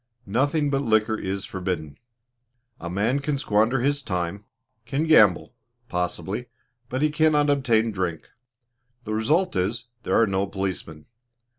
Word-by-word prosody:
Nothing 140 +7 +1
but 135 0 +1
liquor 110 -3 +2
is 100 -1 -4
forbidden. 90 -6 -4 0.8
A 85 - -6
man 110 +9 +1
can 140 0 -1
squander 115 0 +2
his 145 +2 +1
time, 90 -2 -3 0.4
can 140 +5 0
gamble, 105 - +5 0.4
possibly, 95 +6 -3 0.4
but 130 +3 -1
he 155 - +3
cannot 150 -1 +3
obtain 115 -5 +2
drink; 90 -5 -4 0.7
the 110 - -4
result 150 - +1
is, 115 +7 -1
there - - +1
are 115 - +5
no 100 -1 0
policemen. 95 -6 -5
110 Hz, 135 wpm, -24 LUFS, 95-140 Hz, 0.8 s, gamble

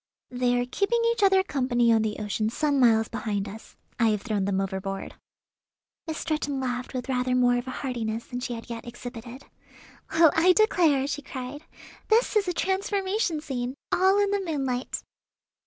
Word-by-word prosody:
"They 245 0 +1
are 245 - 0
keeping 400 - 0
each 465 - -2
other 385 -1 +5
company 245 -8 +2
on 225 - +3
the 215 -1 -2
ocean 215 +1 -1
some 285 +3 0
miles 225 -3 +4
behind 210 -3 -3
us. 215 +3 -11 0.2
I 230 - +4
have 210 -2 -1
thrown 210 -5 -1
them 195 -1 0
overboard." 195 0 -4 0.9
Miss 320 0 -3
Stretton 300 -3 -2
laughed 250 0 -3
with 250 -1 -3
rather 250 -1 0
more 245 -1 +4
of 245 +2 -4
heartiness 235 -4 -3
than 245 - -5
she 245 -1 -4
had 230 - -9
yet 235 -1 -7
exhibited. 240 +1 -9 0.7
"Well, 320 -1 +6
I 360 +3 +5
declare," 335 -10 +3
she 285 +1 -3
cried; 275 +2 -7 0.4
"this 455 +1 +3
is 410 -3 +3
a - - +1
transformation 380 -2 -1
scene, 255 -4 -4 0.2
all 380 +2 +4
in 405 -1 +2
the 405 -1 +1
moonlight!" 270 -7 -2
255 Hz, 170 wpm, -26 LUFS, 235-320 Hz, 0.9 s, Well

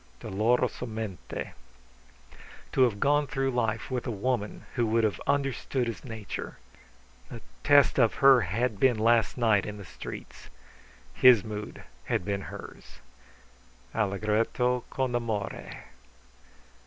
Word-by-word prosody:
[Dolorosomente.] 110 -1 -2 1.2
To - - +1
have 115 -5 +3
gone 145 +3 +2
through 135 -1 -1
life 115 -1 -1
with 125 -1 -2
a - - -1
woman 115 0 -2
who 120 -3 +1
would 115 +1 +2
have 105 -2 0
understood 135 -2 0
his 115 -1 -5
nature. 110 -6 -6 0.7
The - - -8 0.2
test 145 -1 +5
of 115 -3 +4
her 135 -2 +6
had 105 +4 -1
been 125 -2 +4
last 115 +2 +2
night 110 -5 +3
in 105 0 -6
the 100 - -9
streets. - - -9 0.6
His 125 - +6
mood 105 -1 -7 0.2
had - - -1
been 100 -1 -2
hers. - - -11 1.0
[Allegretto 110 +4 0
con 130 -2 -2
amore. 110 -5 -3
115 Hz, 120 wpm, -28 LUFS, 105-125 Hz, 1.2 s, her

